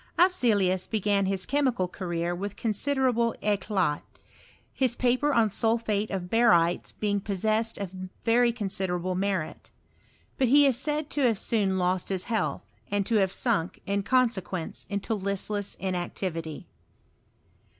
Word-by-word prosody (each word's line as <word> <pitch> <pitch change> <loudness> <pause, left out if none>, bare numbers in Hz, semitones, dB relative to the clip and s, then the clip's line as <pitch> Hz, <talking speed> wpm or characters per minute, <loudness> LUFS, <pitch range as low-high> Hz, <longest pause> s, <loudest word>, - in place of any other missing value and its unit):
Afzelius 210 - +3
began 205 -2 +1
his 190 -1 -1
chemical 260 -9 +1
career 175 -2 -3
with 200 +3 -5
considerable 235 +1 0
eclat, 195 -6 0 0.7
his 255 -3 +1
paper 255 +5 +2
on 230 -5 +3
sulphate 220 -1 0
of 185 -2 -3
barytes 180 -6 +3
being 205 -1 -1
possessed 215 +3 -1
of 195 -3 -5 0.3
very 235 +1 +4
considerable 190 -5 -2
merit. 190 -3 -2 0.7
But 260 - +3
he 285 +4 +6
is 270 -3 +4
said 295 +3 -2
to 290 - -1
have 225 -3 +1
soon 195 -3 0
lost 180 0 0
his 190 -2 -2
health, 225 -2 -1 0.3
and 205 -1 0
to 225 +1 +2
have 190 -2 +2
sunk, 200 -7 -1
in 200 +1 0
consequence, 195 -7 0
into 200 +2 -2
listless 200 0 -2
inactivity. 175 -3 -4
205 Hz, 130 wpm, -27 LUFS, 185-235 Hz, 0.7 s, he